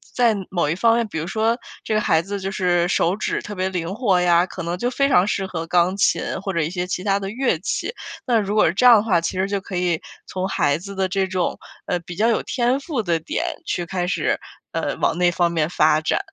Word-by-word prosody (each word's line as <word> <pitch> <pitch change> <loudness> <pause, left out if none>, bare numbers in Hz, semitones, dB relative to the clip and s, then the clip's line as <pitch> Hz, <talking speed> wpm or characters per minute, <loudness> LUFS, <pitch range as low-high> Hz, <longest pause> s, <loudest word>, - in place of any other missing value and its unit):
在 240 -2 +4 0.2
某 175 -5 0
一 - - +1
方 230 +6 +3
面 235 -1 0
比 160 - -4
如 160 - -4
说 225 +4 0 0.2
这 220 - -2
个 215 - +2
孩 165 -6 +2
子 200 +2 -4
就 195 0 -3
是 175 -3 +1
手 180 0 +1
指 215 - -2
特 210 - -7
别 185 -1 -1
灵 180 0 -3
活 205 -6 +2
呀， 175 0 +3
可 185 - -7
能 170 +1 -2
就 245 - 0
非 275 +2 +1
常 190 -8 +4
适 195 -1 -1
合 165 -3 -5
钢 175 +2 +2
琴 200 - +2 0.2
或 195 - -3
者 170 - 0
一 160 0 -1
些 180 0 -3
其 180 0 -3
他 195 0 +1
的 195 -1 -4
乐 240 -6 0
器。 210 - -3 0.3
那 240 -3 +3
如 205 0 -2
果 215 - +5
是 160 - +2
这 190 - 0
样 245 -1 +9
的 210 - +3
话， 185 -7 +2
其 175 +2 -3
实 190 - +1
就 200 -1 -2
可 190 -1 -5
以 175 -2 0 0.2
从 185 0 -3
孩 145 -5 +1
子 200 +3 -9
的 190 0 0
这 190 +1 0
种， 185 -2 -1 0.3
呃， 180 - -1
比 175 0 -9
较 220 +5 +2
有 230 - +2
天 250 +2 0
赋 280 -5 -3
的 170 -4 0
点 160 - -3 0.2
去 175 - -1
开 180 0 -2
始， 180 -4 0 0.3
呃， - - -2
往 - - +1
那 180 0 +4
方 175 0 +1
面 160 -2 0
发 155 -3 +3
展。 155 0 0
185 Hz, 280 characters per minute, -22 LUFS, 175-210 Hz, 0.3 s, 样